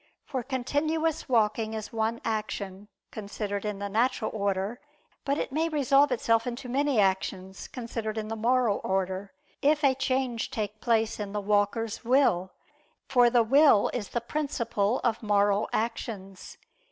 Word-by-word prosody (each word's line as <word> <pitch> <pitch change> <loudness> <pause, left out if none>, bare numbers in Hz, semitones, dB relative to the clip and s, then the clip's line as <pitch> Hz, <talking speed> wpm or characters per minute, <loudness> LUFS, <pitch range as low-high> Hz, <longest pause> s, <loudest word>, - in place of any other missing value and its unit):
For 265 -3 -3
continuous 290 +6 -1
walking 220 -2 +1
is 215 +1 -6
one 225 +1 -1
action, 205 -3 -3 0.2
considered 205 -1 -4
in 210 -1 -2
the 200 0 -4
natural 225 +2 0
order: 200 +2 -2 0.4
but 280 0 +1
it - - -3
may 320 +4 0
resolve 285 -2 +3
itself 230 -1 +1
into 245 +2 -5
many 275 0 +1
actions, 190 -1 -1
considered 230 -3 -5
in 215 -1 -3
the 225 - -3
moral 235 -1 +2
order, 190 +1 -2 0.3
if 300 +1 +3
a 275 -2 +5
change 260 -3 -1
take 215 -1 -4
place 225 -2 +1
in 205 -1 -5
the 210 - -1
walker's 205 +3 0
will, 230 -8 +2 0.6
for 245 -3 +5
the 240 -1 +4
will 270 -2 +5
is 220 -5 -3
the 240 - -2
principle 235 -5 -1
of 230 -2 0
moral 205 -1 +2
actions. 210 -4 -4
225 Hz, 150 wpm, -28 LUFS, 205-255 Hz, 0.6 s, a